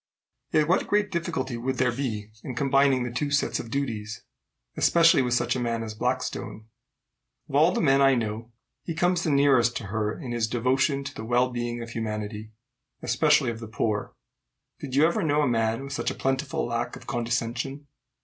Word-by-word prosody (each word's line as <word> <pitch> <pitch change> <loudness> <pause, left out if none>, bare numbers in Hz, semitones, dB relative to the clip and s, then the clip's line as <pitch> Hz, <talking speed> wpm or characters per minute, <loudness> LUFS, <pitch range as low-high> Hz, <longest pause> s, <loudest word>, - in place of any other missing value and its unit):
"Yet 155 -1 +3
what 185 - +2
great 205 -1 +1
difficulty 160 -8 -2
would 130 +2 -2
there 125 -1 +2
be 110 -5 -4
in 130 - -6
combining 135 0 +3
the 125 - -4
two 145 +4 -1
sets 140 0 +1
of 115 - -7
duties, 110 -5 -3 0.5
especially 165 -4 +5
with 125 -1 +1
such - - +1
a - - -1
man 115 -1 -1
as 110 -1 -5
Blackstone? 110 0 -3 0.8
Of - - -12
all 155 +5 +5
the - - -1
men 135 -4 +4
I 135 -1 +5
know, 115 0 -3 0.3
he 165 - -5
comes 175 +1 +2
the 165 - -1
nearest 135 -5 +4
to 110 - -6
her 110 0 -1
in 130 -7 -6
his 120 -2 0
devotion 130 +4 +1
to 140 - -6
the 110 - -7
well 125 +2 +2
being 120 -1 -3
of 115 - -9
humanity, 105 -1 -4 0.5
especially 150 -5 +3
of 115 - -7
the 115 - -7
poor. 105 -1 -2 0.6
Did 135 -3 -6
you 145 +3 +6
ever 170 +6 +1
know 150 -3 +2
a - - +2
man 115 +1 0
with 140 0 -6
such - - -1
a - - -5
plentiful 135 +1 -1
lack 120 0 -2
of - - -12
condescension? 120 +3 -2
125 Hz, 195 wpm, -26 LUFS, 115-140 Hz, 0.8 s, you